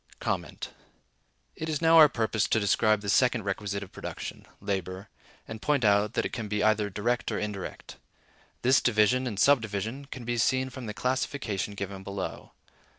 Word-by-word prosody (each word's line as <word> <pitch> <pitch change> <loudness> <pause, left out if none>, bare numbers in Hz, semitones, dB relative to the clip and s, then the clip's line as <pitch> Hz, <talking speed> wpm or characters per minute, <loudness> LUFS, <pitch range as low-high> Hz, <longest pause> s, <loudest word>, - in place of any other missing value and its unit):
It 160 - -5
is 155 -2 -1
now 165 0 +6
our 155 -2 +9
purpose 110 -3 0
to 110 - +2
describe 105 +1 +2
the 100 - -7
second 125 +2 +3
requisite 100 0 -3
of 95 - -12
production, - - -7
labor, 95 -1 -4 0.4
and 110 -1 -7
point 145 -5 +1
out 105 +1 +3
that - - 0
it - - -4
can 115 -3 -4
be 105 0 -1
either 110 -1 +2
direct 120 +5 -1
or - - -1
indirect. 105 -3 -6 0.7
This 130 +2 +5
division 120 +3 +3
and 105 -5 -4
subdivision 115 -1 +1
can 130 -3 -8
be 120 0 -1
seen 130 +3 +1
from 125 -2 -7
the 105 - -5
classification 125 -6 -2
given 100 -1 -5
below. 100 0 -6
110 Hz, 165 wpm, -28 LUFS, 100-125 Hz, 0.7 s, our